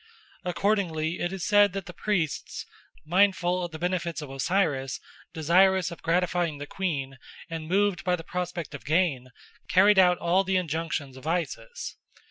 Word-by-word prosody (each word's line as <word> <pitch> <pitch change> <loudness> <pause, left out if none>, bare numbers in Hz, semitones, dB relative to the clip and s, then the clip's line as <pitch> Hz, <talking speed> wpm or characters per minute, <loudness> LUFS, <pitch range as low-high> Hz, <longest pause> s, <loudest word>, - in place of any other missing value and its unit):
Accordingly 180 -4 0
it 175 - -1
is 190 -3 -4
said 205 -2 +5
that 195 -2 -4
the 175 - -9
priests, 175 -8 -2 0.4
mindful 180 0 +2
of 175 - -3
the 160 - -6
benefits 170 -2 -2
of 150 -3 -7
Osiris, 135 -2 0 0.3
desirous 185 +3 +3
of 170 - -9
gratifying 175 -2 +1
the 145 - -6
queen, 140 -8 -3 0.3
and 160 -1 -5
moved 195 +1 +1
by 180 -1 +2
the 165 - -8
prospect 175 -2 -4
of 140 - -8
gain, 150 -6 +1 0.4
carried 195 +2 +6
out 180 -1 +5
all 180 +3 +2
the 190 0 +1
injunctions 160 -5 -3
of 130 +4 -10
Isis. 175 - -3
175 Hz, 155 wpm, -27 LUFS, 155-185 Hz, 0.4 s, carried